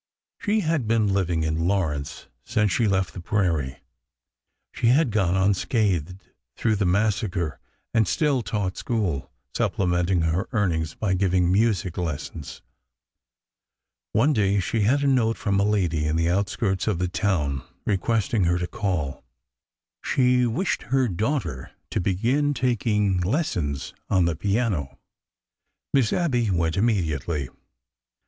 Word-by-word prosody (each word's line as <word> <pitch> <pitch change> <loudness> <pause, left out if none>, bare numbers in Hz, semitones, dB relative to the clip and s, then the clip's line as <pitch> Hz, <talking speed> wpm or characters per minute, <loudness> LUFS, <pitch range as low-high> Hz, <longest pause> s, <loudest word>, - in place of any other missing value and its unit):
She 215 +1 +1
had 155 - 0
been 110 -3 +2
living 85 -4 0
in 80 +1 0
Lawrence 80 -8 -1 0.2
since 105 - +1
she 115 - +2
left 95 -4 0
the 90 - -7
prairie; 80 -9 -1 0.9
she - - 0
had 135 +1 +4
gone 95 -4 +1
unscathed 95 - 0 0.3
through 110 -2 +1
the 100 -2 +1
massacre 95 -4 0 0.3
and 110 -3 +3
still 145 -5 +1
taught 100 -5 -2
school, 105 - -2 0.2
supplementing 90 -1 +1
her 80 +6 0
earnings 80 -8 0
by 100 -3 -1
giving 90 -1 +2
music 95 -4 +1
lessons. 80 -2 -5 1.5
One 140 +8 +3
day 100 -4 +2
she 110 +4 -1
had 135 +8 +2
a - - +2
note 120 -4 +2
from 100 -2 0
a - - +3
lady 90 -7 +1
in 75 - 0
the 80 +1 +1
outskirts 100 0 0
of 105 -5 +1
the 90 +1 0
town 85 -8 0 0.2
requesting 105 0 +1
her 85 +1 +2
to 90 - -2
call. 90 -9 -3 0.8
She 125 -1 +3
wished 165 - -1
her 130 -1 +2
daughter 95 - -2 0.2
to - - 0
begin 125 +11 +1
taking 105 -6 +1
lessons 90 - -1 0.2
on 95 -3 +3
the 85 -1 0
piano. 100 - -1 1.0
Miss 130 -5 +3
Abby 125 - +1
went 85 -3 +1
immediately. 85 - 0
100 Hz, 135 wpm, -24 LUFS, 85-115 Hz, 1.5 s, had